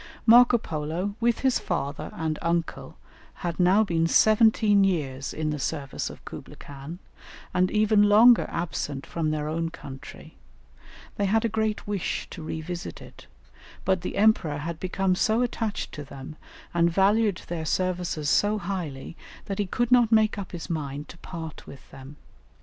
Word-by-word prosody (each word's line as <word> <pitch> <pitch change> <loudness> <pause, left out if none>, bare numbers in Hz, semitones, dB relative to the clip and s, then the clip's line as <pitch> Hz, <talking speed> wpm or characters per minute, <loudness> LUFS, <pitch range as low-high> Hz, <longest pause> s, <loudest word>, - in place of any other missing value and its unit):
Marco 240 +1 +7
Polo, 165 +2 -3
with 235 -1 +1
his 265 -2 +2
father 145 -5 -3
and 160 -1 -2
uncle, 170 0 -2 0.5
had 170 0 -3
now 185 +4 +5
been 165 -5 +1
seventeen 215 0 +4
years 140 -8 -1
in 155 -1 -2
the 150 - -3
service 135 0 -3
of - - -13
Kublaï - - -9
Khan, 140 +4 -9 0.6
and 185 0 +2
even 215 0 +3
longer 220 +4 +6
absent 145 -4 -4
from 165 -2 -2
their 150 -1 -2
own 165 +1 -2
country; 135 -4 -11 0.8
they 205 - +1
had 220 +4 +2
a - - +1
great 220 0 -1
wish 205 -3 -2
to 170 - -8
revisit 160 +3 -5
it, - - -14 0.6
but 190 -2 +1
the 180 - -5
Emperor 195 -8 +3
had 160 +2 -5
become 185 0 0
so 215 +4 +2
much 245 - +3
attached 220 -3 -3
to 145 - -7
them, 140 +1 -10 0.4
and 170 0 +3
valued 200 +2 +2
their 170 -2 -4
services 175 -3 -1
so 205 +7 +3
highly, 170 -7 -5 0.3
that 195 0 -4
he 205 - 0
could 240 +5 -1
not 240 -2 +5
make 220 -1 +4
up 200 -3 -6
his 175 -2 -6
mind 150 -4 -4
to - - -11
part 165 -3 -8
with 135 - -13
them. 135 +2 -11
175 Hz, 165 wpm, -26 LUFS, 155-210 Hz, 0.8 s, Marco